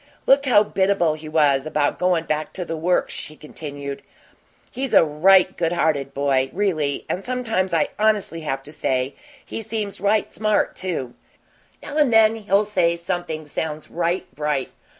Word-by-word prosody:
"Look 275 +1 +4
how 210 -5 +6
biddable 190 -5 +1
he 155 0 -8
was 145 -3 +2
about 150 -1 0
goin' 180 -2 +2
back 155 -1 -3
to 180 - -4
the 165 - -4
Works," 175 +3 0
she 155 - -7
continued. 145 -2 -7 0.7
"He's 265 0 -2
a - - +7
right 180 +5 +4
good 170 0 0
hearted 145 -5 0
boy, 135 -2 +1
really, 160 -8 -1
and 185 - -3
sometimes 225 -7 -1
I 165 - +1
honestly 210 -6 +1
have 135 -3 -3
to 145 - -11
say 130 -3 -1 0.3
he - - -5
seems 215 -3 -4
right 205 +1 +1
smart, 215 -1 +1
too. 155 -10 -3 0.7
Now 290 - -5
and 295 -5 +4
then 225 -1 +6
he'll 205 -1 +1
say 180 -5 +1
something 170 -2 -4
sounds 150 +1 -5
right 175 +2 -1
bright. 150 -3 -2
170 Hz, 165 wpm, -22 LUFS, 150-205 Hz, 0.7 s, a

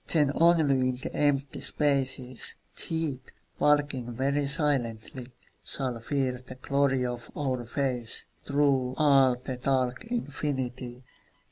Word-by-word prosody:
Then 150 -4 +3
only 155 -6 +4
in - - 0
the 125 - -6
empty 140 -2 +1
spaces, 130 -4 0 0.2
Death, 160 -5 -2 0.4
walking 145 -5 +2
very 140 +4 0
silently, 130 -4 -1 0.3
Shall 130 -4 -3
fear 130 0 -1
the 130 - -10
glory 135 -1 +1
of 120 -1 -5
our 130 -4 -1
faces 125 -1 -1 0.2
Through 140 -3 +2
all 135 -4 +5
the 125 +1 -6
dark 130 - 0
infinity. 130 - -3
135 Hz, 115 wpm, -28 LUFS, 125-145 Hz, 0.4 s, all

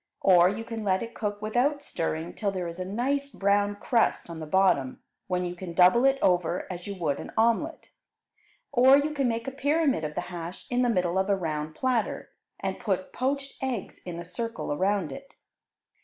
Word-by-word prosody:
Or 180 -2 +6
you 210 +3 -4
can 225 -1 -5
let 190 +1 +1
it 230 0 -8
cook 205 -1 -4
without 260 +7 +1
stirring 165 - -3
till 210 - -1
there 185 -2 -3
is 170 +1 -7
a 185 - -3
nice 270 +8 -1
brown 205 -3 +1
crust 220 -4 +1
on 165 - -7
the 155 - -6
bottom, 150 -7 +2 0.3
when 180 -1 0
you 175 - -3
can 180 -1 -7
double 185 +8 +6
it 270 0 +4
over 180 -1 +2
as 175 +1 -8
you 200 - -4
would 155 -6 -1
an - - -7
omelette. 235 +9 +1 0.8
Or 265 +1 +7
you 295 +2 0
can 280 -4 0
make 230 +1 -2
a - - -2
pyramid 285 - +1
of 150 0 -4
the - - -1
hash 170 +1 -7
in 245 0 +2
the 245 - +3
middle 180 -4 +1
of 190 +1 0
a 200 - +4
round 155 -4 -3
platter, 250 -1 -1 0.3
and - - -3
put - - -2
poached 275 +1 -2
eggs 255 -6 -3
in 175 -2 -6
a 175 - -7
circle 230 -1 -4
around 190 +1 0
it. 275 0 -10
205 Hz, 200 wpm, -27 LUFS, 175-250 Hz, 0.8 s, Or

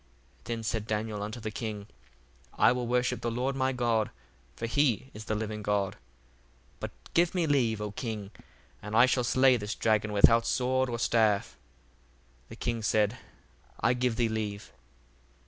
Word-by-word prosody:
1:25 - - -30
Then 115 -1 -4
said 110 0 -2
Daniel 105 -1 -2
unto 110 +4 -5
the 110 -1 -5
king, 105 -2 -5 0.7
I - - +5
will 125 -1 -2
worship 125 +1 0
the 120 - -1
Lord 125 +4 -1
my 130 0 +1
God: 120 -4 +1 0.5
for - - -4
he 130 0 +1
is 105 +1 -9
the 110 - -1
living 105 0 -4
God. 100 -1 0
1:26 - - -21 0.8
But - - -5 0.2
give 170 +1 +3
me 175 -2 +2
leave, 125 -8 +2
O 105 -1 -4
king, 105 -2 -5 0.5
and 105 +1 -5
I 120 +2 +8
shall 130 -1 +1
slay 130 +1 +4
this 105 -1 -4
dragon 110 -1 +1
without 115 +3 +5
sword 130 +1 +1
or 120 - -2
staff. 110 -3 +2 0.9
The - - -9
king 120 -1 -2
said, 105 +2 +1 0.6
I - - +3
give 125 -1 0
thee 120 0 +2
leave. 105 -2 -4
115 Hz, 170 wpm, -29 LUFS, 105-125 Hz, 0.9 s, I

